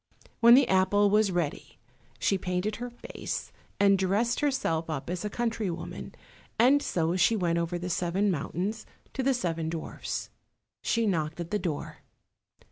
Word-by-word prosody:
When 235 Hz, +1 st, +8 dB
the 270 Hz, 0 st, +5 dB
apple 195 Hz, +2 st, +3 dB
was 210 Hz, -1 st, +4 dB
ready 170 Hz, -5 st, -3 dB, 0.4 s
she 160 Hz, -, +1 dB
painted 185 Hz, +3 st, -2 dB
her 245 Hz, +1 st, -5 dB
face, 240 Hz, -, -6 dB, 0.3 s
and 200 Hz, -1 st, +5 dB
dressed 205 Hz, +6 st, +1 dB
herself 265 Hz, -, 0 dB
up 155 Hz, +1 st, -3 dB
as 180 Hz, +1 st, -3 dB
a 210 Hz, -, -2 dB
country 225 Hz, -2 st, -1 dB
woman, 170 Hz, -, -6 dB, 0.4 s
and 265 Hz, +5 st, +5 dB
so 165 Hz, -5 st, 0 dB
she 185 Hz, +5 st, +4 dB
went 170 Hz, -4 st, +1 dB
over 170 Hz, +1 st, -1 dB
the 175 Hz, +1 st, -5 dB
seven 180 Hz, +3 st, +1 dB
mountains 185 Hz, +6 st, -3 dB, 0.3 s
to 270 Hz, -, -2 dB
the 265 Hz, 0 st, +2 dB
seven 165 Hz, -7 st, -2 dB
dwarfs. 165 Hz, -1 st, -5 dB, 0.5 s
She 230 Hz, -1 st, +1 dB
knocked 160 Hz, -5 st, -1 dB
at 170 Hz, -1 st, -5 dB
the 210 Hz, -, +1 dB
door. 165 Hz, -7 st, -4 dB
190 Hz, 160 wpm, -28 LUFS, 170-225 Hz, 0.5 s, When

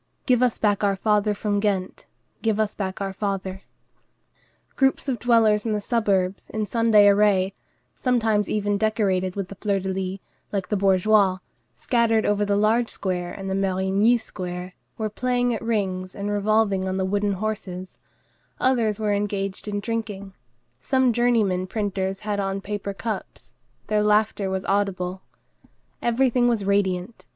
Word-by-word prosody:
"Give 250 Hz, -2 st, +3 dB
us 250 Hz, -2 st, +2 dB
back 205 Hz, -1 st, +1 dB
our 200 Hz, -1 st, +2 dB
father 210 Hz, +1 st, +1 dB
from 205 Hz, 0 st, -1 dB
Ghent, 195 Hz, -3 st, -2 dB, 0.3 s
Give 220 Hz, -2 st, 0 dB
us 215 Hz, -1 st, 0 dB
back 190 Hz, -1 st, -4 dB
our 195 Hz, -1 st, -2 dB
father." 195 Hz, -1 st, -3 dB, 1.1 s
Groups 270 Hz, +1 st, +1 dB
of 255 Hz, -4 st, -1 dB
dwellers 220 Hz, -3 st, +3 dB
in 225 Hz, -, -1 dB
the 210 Hz, -, 0 dB
suburbs, 200 Hz, -4 st, 0 dB
in 215 Hz, -1 st, -2 dB
Sunday 220 Hz, -2 st, +4 dB
array, 200 Hz, -2 st, +3 dB, 0.4 s
sometimes 225 Hz, -5 st, +1 dB
even 205 Hz, -1 st, 0 dB
decorated 195 Hz, -4 st, 0 dB
with 195 Hz, -2 st, -4 dB
the -, -, -7 dB
fleur 200 Hz, 0 st, -1 dB
de 190 Hz, 0 st, -4 dB
lys, 190 Hz, 0 st, -3 dB, 0.3 s
like 195 Hz, -2 st, -3 dB
the 210 Hz, -, +1 dB
bourgeois, 195 Hz, 0 st, +3 dB, 0.4 s
scattered 225 Hz, -, +1 dB
over 205 Hz, 0 st, +2 dB
the 200 Hz, 0 st, +1 dB
large 220 Hz, +3 st, +2 dB
square 180 Hz, -2 st, -3 dB
and 195 Hz, +1 st, -7 dB
the 190 Hz, -, -1 dB
Marigny 195 Hz, +4 st, +2 dB
square, 180 Hz, -4 st, -6 dB, 0.2 s
were 220 Hz, -, -1 dB
playing 245 Hz, +2 st, 0 dB
at 225 Hz, -, -4 dB
rings 190 Hz, -5 st, -2 dB
and 200 Hz, +1 st, -3 dB
revolving 205 Hz, -2 st, +1 dB
on 190 Hz, 0 st, -2 dB
the 190 Hz, -, 0 dB
wooden 200 Hz, +1 st, 0 dB
horses; 190 Hz, -2 st, -5 dB, 0.6 s
others 230 Hz, -5 st, +1 dB
were 210 Hz, -1 st, +1 dB
engaged 200 Hz, -1 st, -2 dB
in 205 Hz, -1 st, -2 dB
drinking; 205 Hz, -3 st, -4 dB, 0.5 s
some 260 Hz, -, +2 dB
journeyman 215 Hz, -6 st, +2 dB
printers 195 Hz, -2 st, -2 dB
had 210 Hz, -1 st, -2 dB
on 195 Hz, 0 st, -1 dB
paper 200 Hz, 0 st, -4 dB
caps; 205 Hz, -, -6 dB, 0.3 s
their 210 Hz, 0 st, +1 dB
laughter 210 Hz, -1 st, +2 dB
was 190 Hz, 0 st, -3 dB
audible. 190 Hz, -2 st, -1 dB, 0.8 s
Everything 245 Hz, 0 st, +2 dB
was 225 Hz, -5 st, 0 dB
radiant. 195 Hz, +1 st, -1 dB
205 Hz, 155 wpm, -24 LUFS, 190-220 Hz, 1.1 s, Sunday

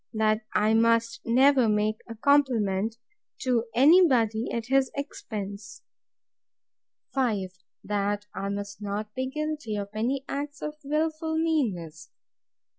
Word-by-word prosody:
That 215 Hz, 0 st, +2 dB
I 215 Hz, +1 st, +3 dB
must 230 Hz, 0 st, +2 dB
never 260 Hz, 0 st, +5 dB
make 210 Hz, +1 st, +1 dB
a 230 Hz, -, -6 dB
compliment 225 Hz, -6 st, +2 dB, 0.5 s
to 245 Hz, -3 st, +1 dB
any 330 Hz, +9 st, +7 dB
body 230 Hz, -4 st, +1 dB
at 230 Hz, -1 st, -3 dB
his 265 Hz, +1 st, +2 dB
expense. 215 Hz, -6 st, -6 dB, 1.3 s
5. 215 Hz, -9 st, 0 dB, 0.3 s
That 205 Hz, 0 st, -1 dB
I 195 Hz, -, -3 dB
must 200 Hz, 0 st, -5 dB
not 210 Hz, +1 st, -4 dB
be 260 Hz, +1 st, -2 dB
guilty 305 Hz, -6 st, -3 dB
of 200 Hz, -1 st, -4 dB
any 255 Hz, +5 st, -1 dB
acts 290 Hz, +1 st, -5 dB
of 300 Hz, -, -3 dB
wilful 315 Hz, +2 st, -1 dB
meanness. 185 Hz, -, -1 dB
230 Hz, 120 wpm, -27 LUFS, 210-275 Hz, 1.3 s, any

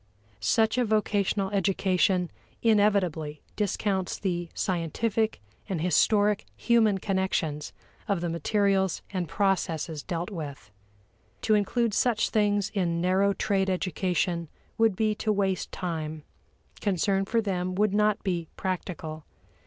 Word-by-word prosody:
Such 220 Hz, -, +2 dB
a -, -, +4 dB
vocational 205 Hz, -3 st, +1 dB
education 190 Hz, -2 st, +1 dB, 0.3 s
inevitably 195 Hz, -9 st, +2 dB
discounts 195 Hz, -2 st, -1 dB
the 175 Hz, -3 st, -2 dB
scientific 205 Hz, +5 st, 0 dB, 0.3 s
and 185 Hz, -4 st, -1 dB
historic 205 Hz, +4 st, +3 dB
human 225 Hz, -4 st, +3 dB
connections 190 Hz, -6 st, -1 dB, 0.4 s
of 200 Hz, -4 st, +1 dB
the 175 Hz, -, -2 dB
materials 190 Hz, +2 st, +1 dB
and 180 Hz, -3 st, -2 dB
processes 165 Hz, -6 st, 0 dB
dealt 175 Hz, +4 st, -4 dB
with. 145 Hz, -, -7 dB, 0.7 s
To 220 Hz, -, +3 dB
include 215 Hz, +2 st, +1 dB
such 230 Hz, 0 st, +2 dB
things 205 Hz, -2 st, +2 dB
in 175 Hz, -5 st, 0 dB
narrow 190 Hz, +3 st, +3 dB
trade 195 Hz, -1 st, 0 dB
education 180 Hz, -2 st, -1 dB, 0.3 s
would 225 Hz, -3 st, +3 dB
be 215 Hz, +1 st, +1 dB
to 215 Hz, +1 st, -1 dB
waste 195 Hz, -3 st, 0 dB
time; 160 Hz, -4 st, -4 dB, 0.6 s
concern 195 Hz, 0 st, +1 dB
for 230 Hz, +3 st, +1 dB
them 185 Hz, -4 st, -1 dB
would 210 Hz, 0 st, +2 dB
not 210 Hz, +1 st, +2 dB
be 175 Hz, -4 st, -1 dB
"practical." 170 Hz, -4 st, -4 dB
190 Hz, 120 wpm, -27 LUFS, 175-210 Hz, 0.7 s, a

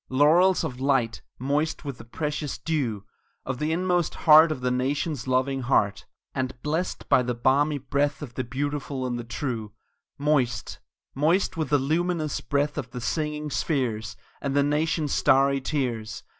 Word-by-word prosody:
Laurels 165 Hz, +8 st, +4 dB
of 130 Hz, -6 st, -4 dB
light, 130 Hz, -4 st, +1 dB, 0.2 s
moist 145 Hz, +5 st, -1 dB
with 140 Hz, -3 st, -5 dB
the -, -, -9 dB
precious 150 Hz, +4 st, -3 dB
dew 125 Hz, -8 st, -2 dB, 0.4 s
Of 130 Hz, -1 st, -3 dB
the 155 Hz, +1 st, 0 dB
inmost 175 Hz, 0 st, 0 dB
heart 155 Hz, 0 st, +7 dB
of 130 Hz, -, -4 dB
the 125 Hz, 0 st, 0 dB
nation's 135 Hz, +2 st, -1 dB
loving 130 Hz, +1 st, +1 dB
heart, 105 Hz, -6 st, +1 dB, 0.3 s
And 130 Hz, -2 st, -3 dB
blest 160 Hz, +5 st, -2 dB
by -, -, +5 dB
the 125 Hz, -1 st, -2 dB
balmy 140 Hz, +5 st, +2 dB
breath 145 Hz, +2 st, -1 dB
of 125 Hz, -5 st, -8 dB
the 130 Hz, -, -2 dB
beautiful 140 Hz, +1 st, -3 dB
and 120 Hz, -1 st, -2 dB
the -, -, -4 dB
true; 115 Hz, -3 st, -4 dB, 0.4 s
Moist 140 Hz, -7 st, 0 dB, 0.3 s
moist 160 Hz, +8 st, +2 dB
with 160 Hz, -4 st, -2 dB
the 145 Hz, -, +4 dB
luminous 155 Hz, +2 st, -1 dB
breath 145 Hz, +1 st, 0 dB
of 130 Hz, -3 st, -5 dB
the 125 Hz, -, -6 dB
singing 150 Hz, +3 st, -2 dB
spheres 120 Hz, -9 st, -1 dB, 0.3 s
And 140 Hz, -1 st, -2 dB
the 140 Hz, -, +4 dB
nation's 150 Hz, 0 st, 0 dB
starry 135 Hz, +1 st, +3 dB
tears! 125 Hz, -6 st, -3 dB
140 Hz, 160 wpm, -26 LUFS, 125-150 Hz, 0.4 s, heart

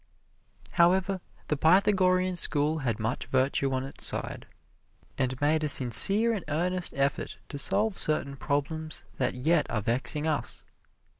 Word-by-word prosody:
However, 185 Hz, +2 st, +1 dB, 0.3 s
the 150 Hz, -, -1 dB
Pythagorean 185 Hz, +2 st, +2 dB
School 155 Hz, -2 st, +1 dB
had 120 Hz, -6 st, -2 dB
much 110 Hz, +3 st, -4 dB
virtue 135 Hz, +1 st, 0 dB
on 130 Hz, 0 st, -2 dB
its 135 Hz, -, -7 dB
side, -, -, -1 dB, 0.7 s
and 130 Hz, -1 st, -3 dB
made 155 Hz, +2 st, 0 dB
a 150 Hz, -, 0 dB
sincere 195 Hz, -, +6 dB
and 200 Hz, -6 st, -5 dB
earnest 180 Hz, +4 st, -1 dB
effort 140 Hz, +1 st, -2 dB
to 145 Hz, -, -7 dB
solve 215 Hz, +9 st, 0 dB
certain 140 Hz, -2 st, -2 dB
problems 155 Hz, +3 st, -4 dB
that -, -, -2 dB
yet 155 Hz, +5 st, 0 dB
are 110 Hz, -4 st, -3 dB
vexing 130 Hz, +7 st, -1 dB
us. 155 Hz, -2 st, -3 dB
155 Hz, 140 wpm, -27 LUFS, 135-180 Hz, 0.7 s, sincere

